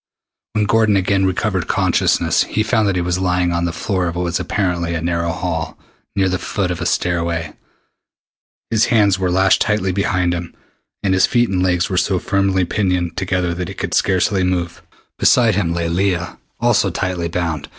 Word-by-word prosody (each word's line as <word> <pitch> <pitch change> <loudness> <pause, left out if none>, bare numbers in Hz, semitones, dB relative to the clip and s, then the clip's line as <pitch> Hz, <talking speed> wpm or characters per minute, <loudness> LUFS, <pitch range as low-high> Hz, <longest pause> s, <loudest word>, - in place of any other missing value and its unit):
When 105 -1 +1
Gordon 105 0 +3
again 95 +1 +1
recovered 95 - -1
consciousness - - +2
he 110 - -1
found 110 -1 +1
that 95 - 0
he 90 - 0
was 90 +1 -1
lying 90 -1 +1
on 85 0 0
the 85 - -1
floor 95 +1 -2
of 85 - -4
what 90 - -1
was 85 0 -1
apparently 85 -4 -1
a - - -1
narrow 85 0 -1
hall, 80 - -3 0.4
near 95 -1 +2
the 90 0 -1
foot 95 -3 -2
of 90 - -4
a - - -1
stairway. 85 -3 -1 1.2
His 110 -1 +3
hands 100 -4 +3
were 95 -1 0
lashed 95 +2 +3
tightly 100 -3 +1
behind 90 -2 0
him, 85 -1 -6 0.5
and 95 -2 +2
his 95 - +4
feet 120 -1 +2
and 95 -1 0
legs 90 -1 +1
were 95 -3 -2
so 95 +1 +1
firmly 95 0 +1
pinioned 90 -3 -1
together 90 -2 -1
that 90 0 -4
he 95 - -8
could - - -4
scarcely 95 +1 +2
move. 90 -2 -2 0.4
Beside 115 -3 +4
him 90 -4 0
lay 85 0 -1
Leah, 90 0 -1 0.2
also 120 -4 +2
tightly 90 -1 -2
bound. 80 -3 -3
90 Hz, 190 wpm, -18 LUFS, 85-100 Hz, 1.2 s, his